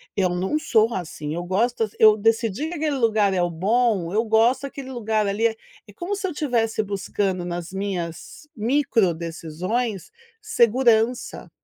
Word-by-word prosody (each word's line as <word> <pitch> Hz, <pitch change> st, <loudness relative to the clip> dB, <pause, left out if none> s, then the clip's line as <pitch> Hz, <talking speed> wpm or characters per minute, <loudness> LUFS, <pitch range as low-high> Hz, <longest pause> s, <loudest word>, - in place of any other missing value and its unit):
Eu 190 Hz, -2 st, +2 dB
não 185 Hz, +12 st, -1 dB
sou 230 Hz, -5 st, +2 dB
assim, 155 Hz, -5 st, -5 dB
eu 175 Hz, +2 st, -3 dB
gosto, 220 Hz, +4 st, 0 dB
eu 215 Hz, -1 st, +6 dB
decidi 225 Hz, +4 st, 0 dB
que 340 Hz, -, -6 dB
aquele 300 Hz, -3 st, -1 dB
lugar 215 Hz, -5 st, +2 dB
é 185 Hz, -, +1 dB
o 175 Hz, -, +1 dB
bom, 195 Hz, +1 st, +1 dB
eu 220 Hz, +2 st, +2 dB
gosto 230 Hz, +5 st, +3 dB
aquele 270 Hz, -1 st, -8 dB
lugar 220 Hz, -3 st, -1 dB
ali. 205 Hz, +3 st, +1 dB
É 225 Hz, -, -4 dB, 0.3 s
é 205 Hz, -, -14 dB
como 355 Hz, -, -4 dB
se 390 Hz, -1 st, -3 dB
eu -, -, -4 dB
estivesse 235 Hz, -8 st, 0 dB
buscando 195 Hz, -2 st, -2 dB
nas 175 Hz, 0 st, -5 dB
minhas 190 Hz, -, -5 dB
micro 225 Hz, -5 st, +1 dB
decisões, 175 Hz, -, -4 dB, 0.3 s
segurança. 240 Hz, -, +2 dB
220 Hz, 160 wpm, -23 LUFS, 185-245 Hz, 0.3 s, eu